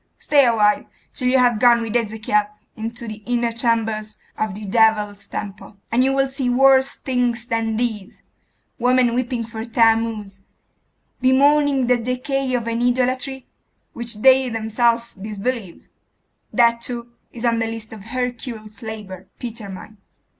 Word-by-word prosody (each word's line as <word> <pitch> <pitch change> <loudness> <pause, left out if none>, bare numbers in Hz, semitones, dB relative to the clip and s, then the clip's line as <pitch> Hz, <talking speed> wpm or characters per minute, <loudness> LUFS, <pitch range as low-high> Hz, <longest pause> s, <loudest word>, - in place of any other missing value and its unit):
Stay 285 -2 +3
awhile, 210 -3 +3 0.3
till 250 - -2
you 260 +1 +4
have 245 -3 +3
gone 240 -1 +6
with 225 0 -4
Ezekiel 215 -2 +1 0.3
into 230 +2 -6
the 215 0 -7
inner 240 -1 0
chambers 225 -2 -1 0.2
of 215 -3 -2
the 210 +1 -7
devil's 210 -1 +2
temple, 200 0 -7
and 240 +2 +3
you 265 - +2
will 270 0 +2
see 265 -1 -2
worse 265 +1 +4
things 245 -3 -1
than 225 -2 -1
these 220 -5 -3 0.6
women 250 0 +3
weeping 245 -1 -1
for 220 0 -6
Thammuz; 225 -4 +1 0.8
bemoaning 280 +1 +4
the 250 0 +3
decay 255 +3 -2
of 235 -2 -2
an 230 0 -1
idolatry 255 +2 0 0.5
which 235 -2 -5
they 265 -1 +6
themselves 230 +1 0
disbelieve 210 0 -5 0.6
That, 235 -1 +3
too, 240 -1 -6 0.2
is 240 0 -6
on 230 -1 +2
the 225 - 0
list 225 -1 -6
of 210 -3 -11
Hercules' 240 -2 -5
labour, 205 -5 -8
Peter 230 -4 -7
mine. 205 +3 -10
235 Hz, 145 wpm, -21 LUFS, 220-250 Hz, 0.8 s, gone